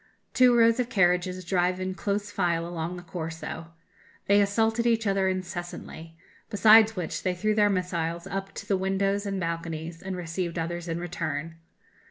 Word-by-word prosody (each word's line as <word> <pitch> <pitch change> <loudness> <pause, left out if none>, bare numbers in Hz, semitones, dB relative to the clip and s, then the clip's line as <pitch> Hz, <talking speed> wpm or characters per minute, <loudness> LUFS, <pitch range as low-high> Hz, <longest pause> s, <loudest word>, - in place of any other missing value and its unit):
Two 250 -2 +5
rows 230 +1 +5
of 250 -1 0
carriages 180 -3 +1
drive 180 0 +1
in 185 0 -2
close 205 +1 -2
file 170 -4 0
along 170 +1 -4
the 175 - -9
Corso. 165 -2 -6 0.6
They 205 +1 +5
assaulted 225 +3 +1
each 225 -1 +2
other 195 -1 +2
incessantly; 175 -3 -5 0.3
besides 220 +1 +6
which, 180 -4 -3
they 180 -1 -1
threw 215 +4 0
their 210 -1 +4
missiles 170 -3 -2
up 195 0 -4
to - - -7
the 195 - +2
windows 195 +2 0
and 195 -1 -2
balconies, 165 -1 -4
and 190 -1 -5
received 170 0 -3
others 170 +1 -3
in 165 0 -2
return. 165 -2 -4
185 Hz, 165 wpm, -27 LUFS, 170-200 Hz, 0.6 s, besides